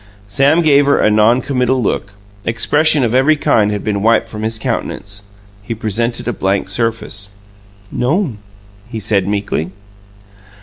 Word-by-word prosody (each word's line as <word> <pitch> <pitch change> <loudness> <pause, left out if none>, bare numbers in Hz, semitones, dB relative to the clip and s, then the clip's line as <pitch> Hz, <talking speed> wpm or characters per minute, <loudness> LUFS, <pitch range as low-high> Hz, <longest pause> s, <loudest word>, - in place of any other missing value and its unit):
Sam 140 +11 +3
gave 145 -2 +4
her 140 - +4
a 110 - +3
non 110 +4 +4
committal 130 -1 0
look 100 -3 -2 0.3
expression 150 +6 +3
of 115 -1 0
every 135 +5 +4
kind 115 -8 +2
had 105 -1 -3
been 100 -2 -1
wiped 115 +1 +2
from 105 -1 -6
his 110 +1 -1
countenance. 100 -2 -4 0.4
He 110 +3 -5
presented 115 +2 -2
a 120 - 0
blank 95 0 -1
surface. 110 -2 -1 0.6
"No'm," 135 - -1 0.5
he 115 -2 -5
said 100 -2 +1
meekly. 100 -5 -2
115 Hz, 145 wpm, -16 LUFS, 105-130 Hz, 0.6 s, gave